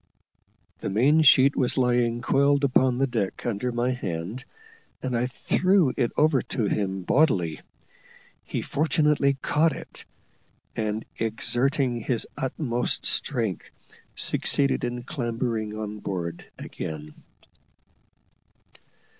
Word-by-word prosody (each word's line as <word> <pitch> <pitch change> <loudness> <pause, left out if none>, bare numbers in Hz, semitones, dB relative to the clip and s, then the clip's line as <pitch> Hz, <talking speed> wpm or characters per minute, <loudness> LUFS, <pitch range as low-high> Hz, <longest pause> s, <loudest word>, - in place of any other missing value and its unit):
The - - -3
main 135 +11 +4
sheet 140 -2 +6
was 125 0 0
lying 120 -2 +1
coiled 140 +2 +3
upon 130 -2 +3
the 135 - +2
deck 115 -7 -3
under 120 +1 -1
my 120 +1 0
hand, 100 0 -4 0.6
and 130 -2 -1
I 120 +1 +1
threw 180 +3 +2
it 120 - 0
over 150 -4 +4
to 120 - -3
him 95 -2 -1
bodily. 95 - +2 0.8
He - - -4
fortunately 150 -2 +2
caught 155 +2 +2
it, - - -9 0.7
and, 110 0 -2
exerting 120 +3 +1
his 115 0 -1
utmost 125 -2 -2
strength, 115 - -1 0.5
succeeded 140 -1 0
in 120 0 -4
clambering 115 -5 -3
on 105 -1 -5
board 85 -4 -5
again. 75 -1 -7
120 Hz, 110 wpm, -25 LUFS, 110-140 Hz, 0.8 s, sheet